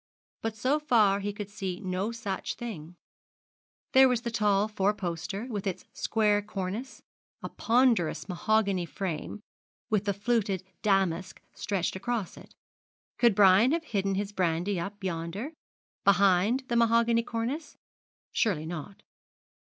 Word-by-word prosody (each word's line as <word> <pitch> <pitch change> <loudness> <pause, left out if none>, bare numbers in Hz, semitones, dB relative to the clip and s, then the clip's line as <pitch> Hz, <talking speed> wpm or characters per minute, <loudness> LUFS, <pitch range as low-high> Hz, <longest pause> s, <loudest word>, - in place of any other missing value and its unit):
But 225 -1 -3
so 265 +7 +1
far 220 -9 +3
he 205 +1 -2
could 205 0 -7
see 190 -3 -4
no 190 +3 -2
such 205 -5 -4
thing 180 -9 -7 1.0
There 265 0 +7
was 245 -2 +1
the 235 -1 -4
tall 210 -2 +2
four 210 -1 0
poster, 190 +3 -4
with 210 -5 -4
its 185 - -4
square 210 -2 +1
cornice, 205 +4 -5 0.4
a - - -4
ponderous 235 -8 +2
mahogany 195 -1 +1
frame 190 +3 -4 0.5
with 210 -1 +1
fluted 205 -4 0 0.2
damask 190 -4 +1
stretched 190 -3 -2
across 215 -1 -3
it. - - -15 0.6
Could 235 -4 +5
Brian 205 +7 +6
have 330 0 0
hidden 195 -8 -1
his 200 +1 -2
brandy 180 0 0
up 200 +4 -6
yonder, 185 - -4 0.5
behind 200 +5 +4
the 240 - -1
mahogany 230 0 +4
cornice? 235 +7 -4 0.5
Surely 180 -9 0
not. 175 +4 -7
205 Hz, 130 wpm, -28 LUFS, 190-230 Hz, 1.0 s, There